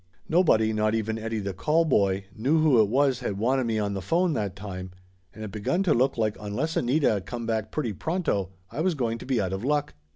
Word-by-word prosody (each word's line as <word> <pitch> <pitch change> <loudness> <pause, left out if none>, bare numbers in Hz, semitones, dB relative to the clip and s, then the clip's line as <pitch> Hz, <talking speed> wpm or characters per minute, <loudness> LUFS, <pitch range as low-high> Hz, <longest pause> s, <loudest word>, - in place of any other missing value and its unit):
Nobody, 110 -11 +3
not 110 0 +1
even 110 0 -2
Eddie 115 0 -3
the 100 -1 -3
callboy, 105 - +2
knew 135 +9 +2
who 145 -7 +5
it 105 - +2
was 135 0 +2
had 100 - -3
wanted 130 +4 +1
me 115 -1 0
on 105 -1 -1
the 95 - -3
phone 170 - +1
that 100 - -2
time, 95 -2 -7 0.4
and 110 - -9
it 105 - -6
begun 110 - 0
to 170 -6 +3
look 130 +2 +2
like 110 -2 0
unless 120 +11 -3
Anita 125 -5 +2
come 120 +3 -5
back 110 -2 -1
pretty 125 -8 -2
pronto, 160 - -1 0.2
I 155 - -3
was 180 0 +1
going 115 -4 -1
to - - -10
be 130 -3 +1
out 95 -1 -1
of 95 +3 -4
luck. 145 +2 0
115 Hz, 225 wpm, -26 LUFS, 105-145 Hz, 0.4 s, who